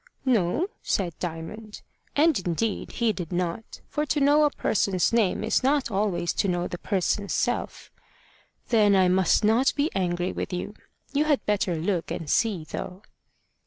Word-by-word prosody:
"No," 235 Hz, -, +2 dB, 0.2 s
said 180 Hz, -4 st, -1 dB
Diamond. 180 Hz, +6 st, -6 dB, 0.3 s
And 310 Hz, -2 st, +4 dB
indeed 190 Hz, +4 st, -2 dB
he 230 Hz, -2 st, +1 dB
did 175 Hz, -5 st, -6 dB
not. 180 Hz, +4 st, -3 dB
For 300 Hz, -, -2 dB
to 295 Hz, -, +1 dB
know 290 Hz, +2 st, +5 dB
a -, -, +4 dB
person's 195 Hz, -7 st, 0 dB
name 215 Hz, -3 st, +2 dB
is 220 Hz, -, +1 dB
not 270 Hz, -2 st, +1 dB
always 195 Hz, -4 st, 0 dB
to -, -, -1 dB
know 175 Hz, -1 st, 0 dB
the 175 Hz, -, -6 dB
person's 200 Hz, +1 st, -1 dB
self. -, -, -2 dB, 0.8 s
"Then 210 Hz, -4 st, +4 dB
I 190 Hz, -1 st, +4 dB
must 185 Hz, +3 st, +3 dB
not 225 Hz, +5 st, +4 dB
be 290 Hz, +3 st, 0 dB
angry 175 Hz, -1 st, -1 dB
with -, -, -4 dB
you. 180 Hz, +3 st, -4 dB, 0.4 s
You 290 Hz, +2 st, +2 dB
had 295 Hz, -3 st, +1 dB
better 200 Hz, -4 st, 0 dB
look 170 Hz, +1 st, -1 dB
and 165 Hz, -, -5 dB
see, 200 Hz, -1 st, +1 dB
though." 180 Hz, +5 st, -7 dB
200 Hz, 160 wpm, -26 LUFS, 180-235 Hz, 0.8 s, know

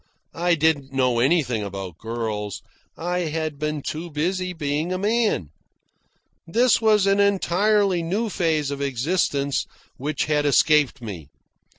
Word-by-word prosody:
I 175 Hz, +1 st, +2 dB
didn't 150 Hz, -4 st, +1 dB
know 130 Hz, -3 st, +1 dB
anything 130 Hz, -4 st, +2 dB
about 95 Hz, -4 st, -6 dB
girls. 110 Hz, -3 st, -4 dB, 0.3 s
I 175 Hz, +2 st, -2 dB
had 155 Hz, -3 st, -3 dB
been 150 Hz, -2 st, -2 dB
too 165 Hz, +3 st, -5 dB
busy 180 Hz, +4 st, -1 dB
being 155 Hz, 0 st, -2 dB
a 185 Hz, -, 0 dB
man. 210 Hz, -, 0 dB, 1.0 s
This 235 Hz, +7 st, +3 dB
was 215 Hz, -3 st, +4 dB
an 195 Hz, 0 st, +3 dB
entirely 200 Hz, -1 st, +2 dB
new 195 Hz, +8 st, -1 dB
phase 160 Hz, -7 st, 0 dB
of 140 Hz, 0 st, -4 dB
existence 140 Hz, +1 st, 0 dB, 0.3 s
which 150 Hz, +4 st, -2 dB
had 150 Hz, -1 st, +1 dB
escaped 145 Hz, -2 st, +3 dB
me. 90 Hz, -10 st, -7 dB
155 Hz, 130 wpm, -23 LUFS, 135-180 Hz, 1.0 s, was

